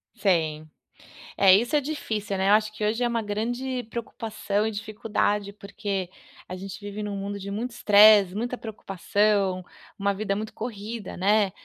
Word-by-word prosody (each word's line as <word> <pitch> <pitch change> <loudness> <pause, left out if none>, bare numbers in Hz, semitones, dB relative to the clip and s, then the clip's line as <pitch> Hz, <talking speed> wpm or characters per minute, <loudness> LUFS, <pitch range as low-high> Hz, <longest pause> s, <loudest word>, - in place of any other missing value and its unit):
Sim. 160 -8 0 0.7
É, 195 -1 +6
isso 235 +9 +3
é 295 - +4
difícil, 220 -9 -3
né, 190 +1 +1
eu - - +6
acho 215 0 +3
que 210 - -2
hoje 225 +3 0
é - - +3
uma 235 -1 -1
grande 245 +5 -3
preocupação 215 -3 -3
e 220 - -1
dificuldade, 210 -1 -1
porque 200 -2 -4 0.4
a 185 - -6
gente 190 +1 -8
vive 205 0 -6
em 210 - -3
um 200 - -4
mundo 200 +1 -4
de 200 +1 -6
muito 230 +5 -3
estresse, 210 -4 +6
muita 245 +4 -2
preocupação, 200 -2 0 0.4
uma 200 0 +1
vida 195 0 -2
muito 215 +2 -5
corrida, 220 -2 -6
né. 200 +1 +3
210 Hz, 170 wpm, -26 LUFS, 200-220 Hz, 0.7 s, É